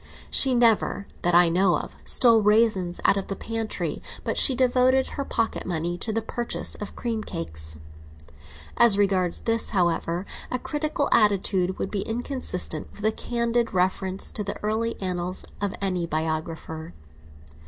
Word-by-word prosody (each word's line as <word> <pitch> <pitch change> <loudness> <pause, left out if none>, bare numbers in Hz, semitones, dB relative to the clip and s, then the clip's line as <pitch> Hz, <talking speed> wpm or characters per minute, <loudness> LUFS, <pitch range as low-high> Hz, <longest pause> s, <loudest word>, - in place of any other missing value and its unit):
She 265 -2 +4
never, 225 -4 +2 0.2
that 175 0 +2
I 175 0 +7
know 175 0 +3
of, - - -7
stole 230 -3 +5
raisins 210 -4 +2
out 200 - +4
of 195 - -3
the 195 - -4
pantry; 225 0 -3 0.2
but - - -2
she 265 - +6
devoted 255 +1 +3
her 280 - -4
pocket 230 -4 -2
money 175 -1 -2
to 220 - -3
the 225 0 -1
purchase 240 +1 -2
of 205 - -7
cream 225 -3 -3
cakes. 80 - -4 1.0
As 230 -4 +7
regards 190 -3 +1
this, 230 -1 +1
however, 175 -2 0 0.2
a 255 - -1
critical 300 +2 -2
attitude 195 -4 +2
would - - -4
be 205 - -1
inconsistent 225 - -2
with 205 - -7
a 220 - +4
candid 235 -1 -1
reference 185 +1 +2
to 210 - -4
the 200 - -4
early 220 +2 -1
annals 180 -1 -3 0.2
of 205 -1 -1
any 180 -3 -1
biographer. 160 +1 -4
200 Hz, 155 wpm, -25 LUFS, 180-230 Hz, 1.0 s, I